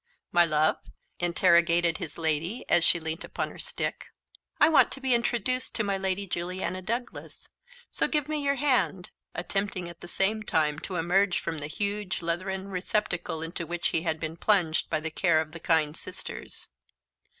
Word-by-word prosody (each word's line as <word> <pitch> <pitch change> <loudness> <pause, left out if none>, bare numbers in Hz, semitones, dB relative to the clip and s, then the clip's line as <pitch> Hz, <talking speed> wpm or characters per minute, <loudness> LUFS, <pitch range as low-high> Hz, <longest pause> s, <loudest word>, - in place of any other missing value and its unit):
"My 175 0 +6
love?" 155 -1 +3 0.4
interrogated 170 -1 +4
his - - -6
lady 165 +7 -1
as 175 -1 +5
she 175 - +5
leant 160 +1 -4
upon - - -3
her - - -12
stick. - - -3 0.5
"I - - +7
want 315 -2 +5
to - - -6
be 265 -2 +1
introduced 240 +1 0
to 220 - +2
my 200 -1 0
Lady 190 +1 -1
Juliana 185 +1 -3
Douglas; 235 +6 -4 0.4
so - - +1
give 300 -2 0
me 305 -1 -1
your 280 0 +2
hand," 255 -10 +1 0.2
attempting, 190 +1 -2
at 170 -1 -11
the - - -8
same 205 +5 +1
time, 155 -7 +1
to 185 - -6
emerge 180 +2 +2
from 160 -2 -4
the 145 - -5
huge 200 0 -2
leathern 190 +3 -2
receptacle 180 -3 -1
into 165 0 -4
which 175 +1 -1
he 160 - +1
had 160 -1 -1
been 160 +1 -4
plunged 175 -5 +2
by 155 - +1
the 160 +1 -3
care 170 -1 +3
of 155 -1 -3
the 165 - -8
kind 155 -2 +2
sisters. - - -6
175 Hz, 175 wpm, -28 LUFS, 165-200 Hz, 0.5 s, I